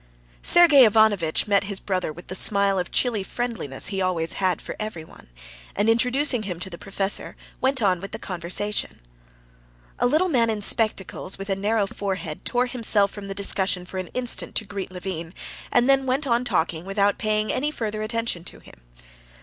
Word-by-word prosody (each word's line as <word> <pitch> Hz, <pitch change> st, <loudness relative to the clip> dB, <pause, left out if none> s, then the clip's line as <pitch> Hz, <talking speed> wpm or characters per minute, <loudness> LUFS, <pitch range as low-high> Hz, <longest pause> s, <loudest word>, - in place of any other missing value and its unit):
Sergey 320 Hz, -6 st, +7 dB
Ivanovitch 210 Hz, -8 st, +3 dB
met 200 Hz, -1 st, +2 dB
his 200 Hz, -1 st, -4 dB
brother 185 Hz, -5 st, -2 dB
with 175 Hz, +3 st, -12 dB
the -, -, -6 dB
smile 200 Hz, 0 st, +2 dB
of 180 Hz, -, -3 dB
chilly 235 Hz, -5 st, +1 dB
friendliness 205 Hz, -, -2 dB
he 190 Hz, -, -1 dB
always 170 Hz, -3 st, -1 dB
had 185 Hz, -3 st, 0 dB
for -, -, -7 dB
everyone, 175 Hz, -, -8 dB, 0.5 s
and 205 Hz, +2 st, +1 dB
introducing 250 Hz, +3 st, +3 dB
him 185 Hz, -5 st, -5 dB
to 190 Hz, +1 st, -5 dB
the 170 Hz, -, -8 dB
professor, 195 Hz, 0 st, -2 dB, 0.3 s
went 265 Hz, -2 st, +2 dB
on 185 Hz, -3 st, +2 dB
with 195 Hz, -, -7 dB
the 220 Hz, -, -4 dB
conversation. 190 Hz, +2 st, -3 dB, 1.0 s
A -, -, +3 dB
little 310 Hz, +8 st, +2 dB
man 240 Hz, -9 st, +2 dB
in 215 Hz, -2 st, -1 dB
spectacles, 200 Hz, -4 st, 0 dB
with 195 Hz, +1 st, -5 dB
a -, -, +2 dB
narrow 205 Hz, +2 st, +1 dB
forehead, 190 Hz, -5 st, -5 dB
tore 245 Hz, 0 st, +1 dB
himself 220 Hz, -5 st, +1 dB
from 205 Hz, -1 st, -8 dB
the 195 Hz, -, -5 dB
discussion 190 Hz, -2 st, +1 dB
for 185 Hz, +1 st, -6 dB
an 185 Hz, -, -5 dB
instant 250 Hz, -1 st, 0 dB
to 220 Hz, -, 0 dB
greet 200 Hz, -1 st, -6 dB
Levin, 180 Hz, -2 st, -6 dB, 0.4 s
and 245 Hz, +1 st, +3 dB
then 270 Hz, -1 st, +3 dB
went 265 Hz, +4 st, +1 dB
on 240 Hz, -1 st, +1 dB
talking 165 Hz, -8 st, -1 dB
without 200 Hz, +1 st, 0 dB
paying 215 Hz, 0 st, 0 dB
any 290 Hz, +3 st, 0 dB
further 215 Hz, -7 st, -4 dB
attention 225 Hz, -5 st, -2 dB
to -, -, -9 dB
him. -, -, -17 dB
205 Hz, 180 wpm, -24 LUFS, 185-230 Hz, 1.0 s, Sergey